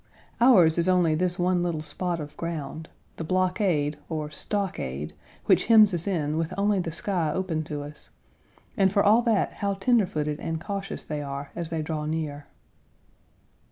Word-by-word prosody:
Ours 180 -10 +6
is 170 +2 +2
only 180 -3 +3
this 175 +2 0
one 180 -1 +1
little 170 -3 -2
spot 175 +1 -3
of 150 -1 -7
ground 160 -1 -5 0.3
the - - -4
blockade, 180 -4 0
or 155 -2 -3
stockade, 115 - -3 0.3
which - - +4
hems 215 -3 +6
us 175 +2 -3
in 155 -5 0
with 165 -1 -2
only 200 0 +2
the 170 -2 -3
sky 170 -2 -1
open 165 -2 -2
to 145 -1 -5
us, 150 +1 -12 0.7
and 195 -2 +3
for 200 0 +3
all 215 +3 +5
that, 230 -4 +1
how 200 -1 -2
tender 215 +1 +3
footed 150 -2 -2
and 165 -1 -3
cautious 195 +2 -5
they 150 -1 -4
are 140 0 -6
as 170 -2 -4
they 160 -2 -2
draw 155 -1 -3
near. 150 -2 -4
170 Hz, 170 wpm, -26 LUFS, 155-195 Hz, 0.7 s, Ours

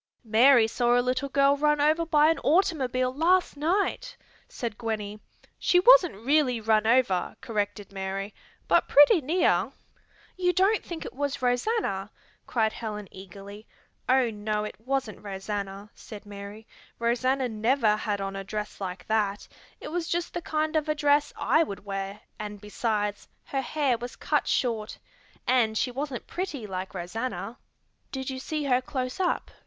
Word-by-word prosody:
"Mary 235 +2 +6
saw 240 +2 +2
a - - +5
little 255 +3 -1
girl 275 +1 +4
run 300 +1 +2
over 310 +3 +2
by 305 0 +5
an 325 - -1
automobile 265 -7 +1
last 345 +5 +2
night," 400 +10 -1 0.3
said 235 -5 -5
Gwenny. 215 -2 -4 0.4
"She 355 - +4
wasn't 470 - +6
really 275 -4 +3
run 220 0 +2
over," 230 -6 +2
corrected 205 -5 -3
Mary, 195 +1 -4 0.3
"but - - +3
pretty 295 +6 +6
near." 325 +7 +2 0.6
"You 360 -1 +1
don't 390 +4 +3
think 340 -2 -7
it - - -7
was 280 -1 -3
Rosanna?" 245 - 0 0.4
cried 220 -2 +1
Helen 210 -3 -6
eagerly. 195 +3 -11 0.4
"Oh, 255 -2 +4
no, 210 0 -2
it 210 - -5
wasn't 250 -3 -3
Rosanna," 200 0 -5
said 210 -2 -11
Mary. 205 +1 -9 0.3
"Rosanna 255 +3 +1
never 225 0 +2
had 210 -1 -2
on 195 0 -4
a 195 - -4
dress 210 +1 -5
like 185 -1 -5
that; 205 -2 0 0.3
it - - -7
was 340 0 -2
just 345 0 -2
the 345 - -3
kind 310 0 -1
of 310 0 0
a 305 - +1
dress 290 -1 +2
I 315 - +3
would 200 -10 -4
wear 195 0 -5 0.2
and, 210 -1 -6
besides, 210 0 -2 0.2
her 270 - -2
hair 265 -3 0
was 245 +1 -7
cut - - 0
short. 225 -4 -1 0.5
And 240 -4 +2
she 250 - 0
wasn't 270 0 -4
pretty 325 - -4
like 190 -1 -5
Rosanna." 225 +5 -4 0.5
"Did 265 0 -4
you 260 - -5
see 305 +3 -3
her 255 -2 +2
close 255 +3 -4
up?" 365 -2 -1
245 Hz, 160 wpm, -27 LUFS, 210-290 Hz, 0.6 s, Mary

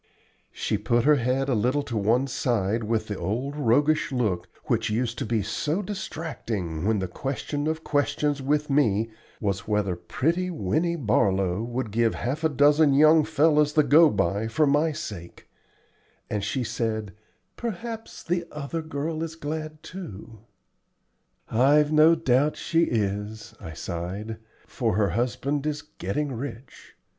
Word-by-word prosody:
She 105 - -2
put 120 +3 +1
her 150 0 +5
head 130 +2 0
a 135 - +1
little 125 +6 +1
to 120 - -5
one 115 +5 +2
side 115 -4 0
with 110 0 0
the 105 - -3
old 130 +8 -2
roguish 145 +3 +2
look 105 -9 -1 0.2
which - - 0
used 115 +2 -1
to - - -3
be 110 -2 0
so 155 - -1
distracting 115 - -4
when 110 -1 +2
the 95 -1 -2
question 140 - -3
of 160 0 -2
questions 145 0 0
with 150 +2 +1
me 115 -6 +2 0.3
was 100 -3 -2
whether 105 -4 0
pretty 165 - -1
Winnie 165 - 0
Barlow 100 - +1
would 120 -1 -3
give 115 +1 +2
half 140 +6 -3
a 160 - +4
dozen 145 0 +4
young 155 +2 +6
fellows 150 -1 +3
the 155 -1 +5
go 155 +3 +6
by 100 0 0
for 135 +8 +2
my 145 +3 +3
sake, 85 - -8 0.8
and 105 -2 -1
she 130 +3 -1
said, 110 -3 -2 0.4
"Perhaps 225 0 -6
the 175 0 -1
other 150 +2 -4
girl 155 +1 -3
is 165 -1 -4
glad 155 0 -5
too." 115 - -9 1.1
"I've 145 +6 +4
no 155 +2 +6
doubt 145 -1 +2
she 165 0 +2
is," 105 0 -2
I 80 - -8
sighed, 95 +8 -5 0.3
"for - - -1
her 105 -2 +2
husband 130 - -1
is 150 -1 -2
getting 145 - -3
rich. 125 0 -8
130 Hz, 150 wpm, -26 LUFS, 110-150 Hz, 1.1 s, young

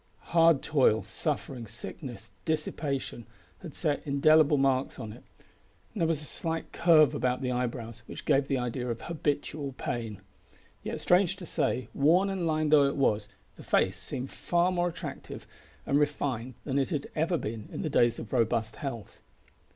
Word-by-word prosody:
Hard 165 -4 +5
toil, 125 -8 +3
suffering, 120 +4 -3
sickness, - - -8
dissipation, 140 -6 -2 0.3
had 165 -6 -9
set 150 -4 0
indelible 150 +1 +4
marks 135 -1 +1
on 110 -1 -6
it, - - -13 0.7
and 210 - -4
there 165 - +3
was 155 -2 0
a - - -7
slight 165 +2 -3
curve 155 -5 +5
about 125 +1 0
the 125 - 0
eyebrows 120 -2 -3
which - - -8
gave 135 0 +3
the 135 - +1
idea 125 0 -2
of 115 -1 -3
habitual 145 -3 -2
pain. 115 -5 -4 0.6
Yet - - -5
strange 185 +1 +3
to 185 -2 -9
say, 130 -6 -1
worn 175 +8 +4
and 185 -3 -1
lined 155 -1 +1
though 145 -2 +7
it 140 - 0
was, 105 -6 +1 0.3
the - - -11
face - - +2
seemed 130 +2 -5
far 175 +1 +1
more 175 -1 +1
attractive 165 - -7 0.4
and 140 - +2
refined 130 -5 -1
than 140 -1 0
it 135 - 0
had 150 -5 -2
ever 165 +3 +1
been 110 -5 -5
in - - -4
the - - -1
days 120 -3 +3
of 115 - -8
robust 115 -2 +1
health. 120 -7 -6
140 Hz, 170 wpm, -29 LUFS, 125-160 Hz, 0.7 s, though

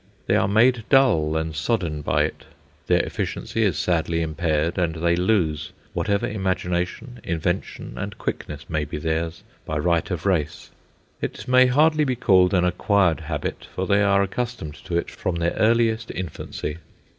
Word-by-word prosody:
They - - +2
are - - +3
made 115 +3 +4
dull 80 - +4
and 80 -1 -3
sodden 75 -2 -1
by - - +2
it. - - -4 0.4
Their - - +4
efficiency 115 - -3
is 95 -8 +2
sadly 85 -1 0
impaired, 80 +1 0
and 85 -2 0
they 85 +1 +1
lose 85 -5 0 0.2
whatever 100 +2 0
imagination, 95 +4 -2
invention, 85 -6 -3
and 100 +4 -5
quickness 75 0 -5
may 80 -2 -1
be 75 - -5
theirs 80 +2 -2 0.2
by 80 - -3
right 85 +1 +1
of 90 -2 -4
race. 80 -6 -1 0.5
It - - -5
may 130 0 +6
hardly 155 +4 +4
be 130 -3 0
called 95 -5 +4
an 90 -1 +3
acquired 90 -1 +2
habit, 75 -2 -4
for 95 - -1
they 100 +1 +3
are 100 -1 +4
accustomed 105 -6 -4
to 85 - -1
it 85 - -2
from 90 -3 -3
their 85 0 0
earliest 115 0 +2
infancy. 80 -3 -5
90 Hz, 160 wpm, -23 LUFS, 80-105 Hz, 0.5 s, may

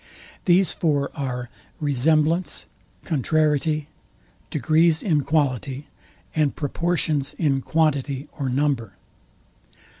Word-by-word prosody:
These 185 +1 +4
four 145 -4 0
are 125 -4 -4 0.3
RESEMBLANCE, 155 +4 +1 0.4
CONTRARIETY, 155 0 +1 0.6
DEGREES 160 +2 +3
IN 155 -7 +2
QUALITY, 140 -2 -1 0.5
and 150 -3 +2
PROPORTIONS 155 -1 -1
IN 140 -5 +1
QUANTITY 145 -2 0
OR 135 -2 -1
NUMBER. 130 -6 0
150 Hz, 85 wpm, -23 LUFS, 135-160 Hz, 0.6 s, These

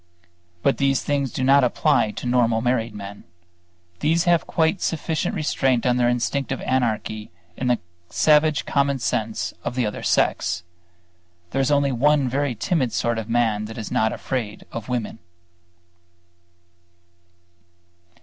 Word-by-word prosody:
But 140 - +2
these 135 -1 +2
things 140 -3 -1
do 130 - -3
not 135 +1 +5
apply 125 -2 +2
to 105 - -7
normal 120 -2 +2
married 115 -2 0
men. 100 0 -8 0.8
These 165 +3 +2
have 175 -2 +3
a - - -19
quite 160 +3 +1
sufficient 160 -1 -1
restraint 135 -5 +1
on 125 -1 +3
their 120 -1 +3
instinctive 135 +3 -1
anarchy 110 -4 -1 0.3
in 130 - -3
the 125 -1 +3 0.3
savage 150 -1 +3
common 140 -1 +1
sense 110 -7 -2
of - - -3
the 125 -2 +1
other 105 - -4
sex. 85 - +1 0.9
There 135 - +1
is 135 - +1
only 140 -1 +2
one 140 +2 +3
very 135 0 -1
timid 135 - 0
sort 120 -1 0
of 110 0 -7
man 115 -3 +1
that 110 +2 -8
is 110 - -6
not 110 0 +2
afraid 115 -6 -4
of 115 +1 -6
women. 120 -2 -3
125 Hz, 145 wpm, -23 LUFS, 115-140 Hz, 0.9 s, not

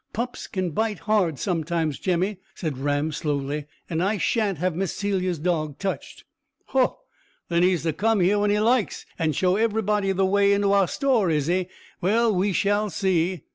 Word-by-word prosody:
"Pups 245 +3 -4
can 185 -3 -2
bite 220 +5 -1
hard 180 -3 +1
sometimes, 165 -3 -1
Jemmy," 185 +2 0 0.2
said 155 -7 -4
Ram 145 +2 0
slowly; 145 -1 -2 0.2
"and 165 0 -2
I 205 +3 +1
shan't 205 -2 0
have 180 +1 -1
Miss 190 0 -2
Celia's 185 -3 -1
dog 155 -3 -1
touched." 195 -1 -5 0.5
"Ho! 265 - +1 0.5
Then 170 0 +2
he's 180 -2 +2
to 165 -2 0
come 225 +4 +1
here 190 +3 +3
when 205 0 +2
he 205 +1 +2
likes, 230 0 +1
and 160 -3 0
show 185 +4 +2
everybody 210 -2 +1
the 190 0 +1
way 200 +1 +3
into 200 0 +2
our 200 -2 +4
store, 245 -8 +1
is 150 -3 +1
he? 180 +2 0 0.3
Well, 220 +4 +3
we 195 +2 +1
shall 205 +3 +1
see." 180 -4 0
185 Hz, 175 wpm, -24 LUFS, 165-205 Hz, 0.5 s, our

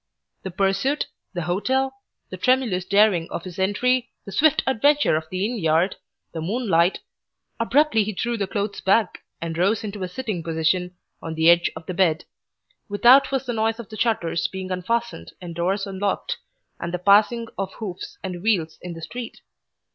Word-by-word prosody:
The 190 - -5
pursuit, 195 +10 0 0.3
the 175 - -2
hotel, 260 +10 0 0.4
the - - -4
tremulous 230 -5 +1
daring 200 -4 +3
of 170 - -5
his 185 0 -8
entry, 250 +6 +1 0.2
the 195 - -8
swift 305 +6 +3
adventure 285 - +3
of 155 0 -3
the 185 +2 -1
inn 235 +1 -2
yard, 165 +2 +2 0.4
the 165 - -4
moonlight 185 -2 +1 0.6
Abruptly 240 -1 +3
he 215 - -3
threw 235 +5 -2
the 200 -3 -2
clothes 200 +1 -3
back 210 +3 +2 0.2
and 165 -1 -4
rose 200 +5 +2
into 205 -1 -6
a 185 - -2
sitting 215 -3 -4
position 165 +3 0 0.3
on 160 0 -5
the 160 +1 +6
edge 170 0 +3
of 160 0 -9
the 185 - -4
bed. 170 -3 +2 0.6
Without 245 +8 +6
was 270 -1 -1
the 245 - -2
noise 225 +1 0
of 235 - -8
shutters 215 -7 0
being 190 -1 -6
unfastened 185 - -2
and 175 -2 -7
doors 190 +4 -1
unlocked, 195 0 -2 0.4
and 170 - -4
the 180 - -1
passing 210 +5 +4
of 195 0 -4
hoofs 190 -5 -7
and 180 -2 -5
wheels 175 -7 0
in 180 -1 -6
the 165 -1 -9
street. 240 +5 -7
195 Hz, 175 wpm, -23 LUFS, 175-230 Hz, 0.6 s, the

